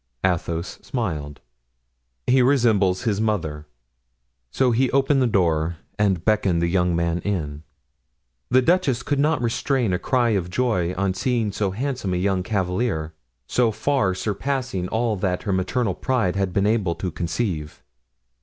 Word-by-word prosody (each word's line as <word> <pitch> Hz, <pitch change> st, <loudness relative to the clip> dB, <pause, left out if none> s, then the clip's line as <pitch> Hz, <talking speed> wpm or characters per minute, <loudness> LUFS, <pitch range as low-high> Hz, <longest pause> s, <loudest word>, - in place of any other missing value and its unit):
Athos 85 Hz, -1 st, -2 dB
smiled. 75 Hz, -, -4 dB, 0.8 s
"He 130 Hz, +1 st, +4 dB
resembles 115 Hz, -7 st, +3 dB
his 105 Hz, -4 st, 0 dB
mother." 80 Hz, -9 st, -2 dB, 0.8 s
So 125 Hz, -, +2 dB
he 125 Hz, +2 st, +2 dB
opened 135 Hz, +1 st, +2 dB
the 125 Hz, -, +3 dB
door 85 Hz, -5 st, +1 dB, 0.2 s
and 95 Hz, -5 st, +1 dB
beckoned 100 Hz, -5 st, +2 dB
the 85 Hz, -, +1 dB
young 90 Hz, -1 st, +1 dB
man 85 Hz, 0 st, 0 dB
in. 80 Hz, -6 st, -3 dB, 0.9 s
The 130 Hz, +1 st, +4 dB
duchess 135 Hz, -7 st, +2 dB
could 145 Hz, -1 st, -1 dB
not 150 Hz, -2 st, +2 dB
restrain 120 Hz, -2 st, 0 dB
a 90 Hz, -, 0 dB
cry 125 Hz, -3 st, +1 dB
of 95 Hz, -5 st, 0 dB
joy 90 Hz, -5 st, 0 dB
on 100 Hz, 0 st, 0 dB
seeing 115 Hz, 0 st, 0 dB
so 100 Hz, 0 st, -1 dB
handsome 120 Hz, -2 st, -2 dB
a -, -, 0 dB
young 95 Hz, 0 st, +1 dB
cavalier, 90 Hz, -4 st, -1 dB, 0.3 s
so 120 Hz, -, +2 dB
far 110 Hz, -4 st, 0 dB
surpassing 110 Hz, -1 st, -2 dB
all 110 Hz, +1 st, 0 dB
that 90 Hz, -1 st, -1 dB
her 100 Hz, -, -1 dB
maternal 95 Hz, +3 st, 0 dB
pride 115 Hz, -4 st, 0 dB
had 95 Hz, -1 st, 0 dB
been 100 Hz, +2 st, +1 dB
able 105 Hz, -6 st, +1 dB
to 90 Hz, -, -4 dB
conceive. 80 Hz, -1 st, -3 dB
100 Hz, 150 wpm, -23 LUFS, 90-120 Hz, 0.9 s, He